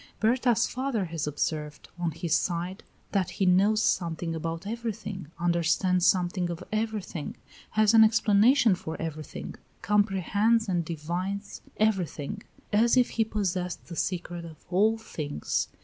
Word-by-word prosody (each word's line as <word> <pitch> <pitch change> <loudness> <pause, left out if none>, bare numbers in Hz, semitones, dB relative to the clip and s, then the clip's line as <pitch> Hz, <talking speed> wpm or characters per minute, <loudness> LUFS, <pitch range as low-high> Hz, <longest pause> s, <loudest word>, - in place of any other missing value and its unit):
Berta's 235 0 +3
father 255 -6 -2
has 165 -3 -3
observed, 150 0 -3
on 175 -1 0
his 160 +1 -2
side, 180 +2 -2 0.3
that 190 -3 +1
he 190 - -1
knows 200 +4 +4
something 165 -1 0
about 165 +2 -4
everything, 215 -5 -5
understands 175 +1 +2
something 180 0 +1
of 170 -1 -5
everything, 215 -7 -3 0.3
has 215 0 +3
an 225 -1 +9
explanation 220 +2 +5
for 160 -3 -5
everything, 155 -2 -6 0.3
comprehends 210 +2 +2
and 175 -3 0
divines 175 +6 -4 0.2
everything, 200 -3 0 0.3
as 230 +4 +4
if 250 - +4
he 225 - +2
possessed 185 -5 -2
the 170 - -6
secret 175 -1 -3
of 160 -2 -12
all 215 +5 +3
things. 150 -9 -3
185 Hz, 135 wpm, -28 LUFS, 170-215 Hz, 0.3 s, an